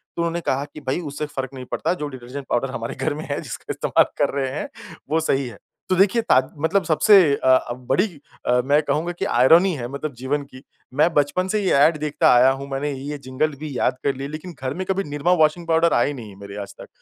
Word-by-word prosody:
तो 170 Hz, -, -2 dB
उन्होंने 170 Hz, 0 st, -1 dB
कहा 140 Hz, -2 st, -1 dB
कि 150 Hz, -, -9 dB
भई 135 Hz, -, 0 dB
उससे 145 Hz, +2 st, -4 dB
फ़र्क 135 Hz, -2 st, -5 dB
नहीं 130 Hz, -1 st, -8 dB
पड़ता 165 Hz, +3 st, 0 dB
जो 150 Hz, -5 st, -4 dB
डिटर्जेंट 130 Hz, +1 st, -8 dB
पाउडर 130 Hz, +2 st, 0 dB
हमारे 115 Hz, -2 st, -5 dB
घर 155 Hz, -, -1 dB
में 155 Hz, +2 st, -6 dB
है -, -, -1 dB
जिसका -, -, -8 dB
इस्तेमाल -, -, +2 dB
कर -, -, +2 dB
रहे 135 Hz, -1 st, -1 dB
हैं -, -, -5 dB, 0.4 s
वो 160 Hz, -, +2 dB
सही 140 Hz, -4 st, 0 dB
है। 115 Hz, -4 st, -10 dB, 0.3 s
तो 185 Hz, -, +3 dB
देखिए 200 Hz, +5 st, +3 dB
ताद 130 Hz, -, +2 dB
मतलब 185 Hz, +5 st, +1 dB
सबसे 170 Hz, +6 st, +5 dB, 0.2 s
अ 130 Hz, -, -3 dB
अ, 130 Hz, -2 st, +3 dB
बड़ी 130 Hz, -, 0 dB, 0.4 s
अ, 125 Hz, 0 st, +3 dB
मैं 145 Hz, +2 st, +4 dB
कहूँगा 160 Hz, +3 st, -1 dB
कि -, -, 0 dB
आयरनी 165 Hz, +10 st, +5 dB
है 120 Hz, -1 st, -4 dB
मतलब 140 Hz, +2 st, -5 dB
जीवन 140 Hz, +2 st, -1 dB
कि 130 Hz, -, -12 dB, 0.3 s
मैं 160 Hz, +4 st, +3 dB
बचपन 150 Hz, +5 st, +1 dB
से 210 Hz, +2 st, 0 dB
ये 185 Hz, -, +2 dB
एड 160 Hz, 0 st, +2 dB
देखता 150 Hz, -1 st, +2 dB
आया 125 Hz, +2 st, +6 dB
हूँ 140 Hz, -, -6 dB
मैंने 140 Hz, +2 st, -2 dB
ये 140 Hz, +2 st, -5 dB
जिंगल 150 Hz, +4 st, 0 dB
भी 150 Hz, -5 st, -5 dB
याद -, -, +1 dB
कर 140 Hz, -1 st, +1 dB
लिया 135 Hz, +1 st, -5 dB
लेकिन 155 Hz, +3 st, -8 dB
घर 130 Hz, 0 st, -2 dB
में 185 Hz, +4 st, -4 dB
कभी 190 Hz, +1 st, +1 dB
निरमा 145 Hz, +5 st, 0 dB
वाशिंग 165 Hz, +2 st, -3 dB
पाउडर 165 Hz, +1 st, +3 dB
आए 130 Hz, +5 st, +2 dB
नहीं 120 Hz, -6 st, -9 dB
है 100 Hz, -, -13 dB
मेरे 100 Hz, 0 st, -9 dB
आज 100 Hz, -, -8 dB
तक। -, -, -10 dB
145 Hz, 245 wpm, -22 LUFS, 130-165 Hz, 0.4 s, आया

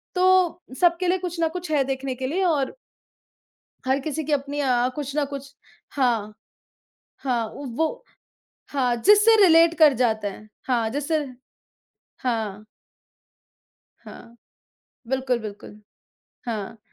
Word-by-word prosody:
तो, 365 Hz, -1 st, +3 dB, 0.2 s
सबके 350 Hz, +1 st, +3 dB
लिए 365 Hz, +1 st, +2 dB
कुछ 355 Hz, -2 st, -5 dB
ना 330 Hz, -, +3 dB
कुछ 355 Hz, 0 st, -6 dB
है 290 Hz, -3 st, +3 dB
देखने 265 Hz, 0 st, -3 dB
के 260 Hz, +1 st, -4 dB
लिए 355 Hz, +8 st, -1 dB
और 290 Hz, -6 st, 0 dB, 1.1 s
हर 265 Hz, +1 st, +2 dB
किसी 310 Hz, +2 st, -3 dB
की 300 Hz, -, -3 dB
अपनी 285 Hz, 0 st, -1 dB
अ, 250 Hz, -2 st, +2 dB
कुछ 285 Hz, -2 st, -4 dB
ना 295 Hz, -, +2 dB
कुछ 275 Hz, 0 st, -7 dB, 0.4 s
हाँ। 230 Hz, -6 st, 0 dB, 0.9 s
हाँ, 245 Hz, -4 st, 0 dB
वो 285 Hz, -, -3 dB, 0.7 s
हाँ 255 Hz, -4 st, +1 dB
जिससे 415 Hz, -, +6 dB
रिलेट 335 Hz, -2 st, +6 dB
कर 305 Hz, -3 st, +7 dB
जाते 220 Hz, -3 st, 0 dB
हैं 215 Hz, +2 st, -9 dB, 0.2 s
हाँ 235 Hz, -4 st, +1 dB
जिससे 290 Hz, +4 st, -1 dB, 0.9 s
हाँ। 215 Hz, -4 st, -3 dB, 1.4 s
हाँ। 235 Hz, 0 st, -13 dB, 0.7 s
बिल्कुल, 260 Hz, -1 st, 0 dB
बिल्कुल। 210 Hz, -1 st, -9 dB, 0.7 s
हाँ। 220 Hz, -2 st, -5 dB
275 Hz, 125 wpm, -24 LUFS, 240-325 Hz, 1.4 s, कर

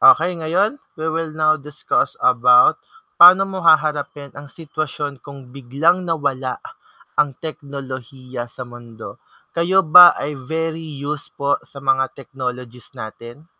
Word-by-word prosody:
Okey, 395 Hz, -, +5 dB
ngayon, 195 Hz, -, -1 dB, 0.2 s
we 160 Hz, 0 st, -3 dB
will 165 Hz, 0 st, -3 dB
now 155 Hz, -1 st, 0 dB
discuss 150 Hz, +1 st, -2 dB
about 415 Hz, 0 st, +4 dB, 0.4 s
pa'no 185 Hz, +3 st, +9 dB
mo 190 Hz, -1 st, -6 dB
haharapin 150 Hz, -3 st, +1 dB
ang 145 Hz, 0 st, -12 dB
sitwasyon 145 Hz, -2 st, -6 dB
kung 135 Hz, -2 st, -13 dB
biglang 145 Hz, +8 st, 0 dB
nawala 140 Hz, -5 st, -2 dB, 0.6 s
ang 140 Hz, -4 st, -1 dB
teknolohiya 130 Hz, -4 st, -8 dB
sa 125 Hz, -, -9 dB
mundo, 120 Hz, -2 st, -12 dB, 0.3 s
kayo 185 Hz, +3 st, +1 dB
ba 175 Hz, +3 st, +8 dB
ay 150 Hz, -, -4 dB, 0.2 s
very 160 Hz, 0 st, -3 dB, 0.2 s
used 145 Hz, 0 st, -6 dB
po 140 Hz, 0 st, -1 dB
sa 140 Hz, -1 st, -13 dB
mga 135 Hz, -1 st, 0 dB
technologies 125 Hz, -3 st, -8 dB
natin? 120 Hz, +4 st, -10 dB
145 Hz, 130 wpm, -19 LUFS, 130-165 Hz, 0.6 s, pa'no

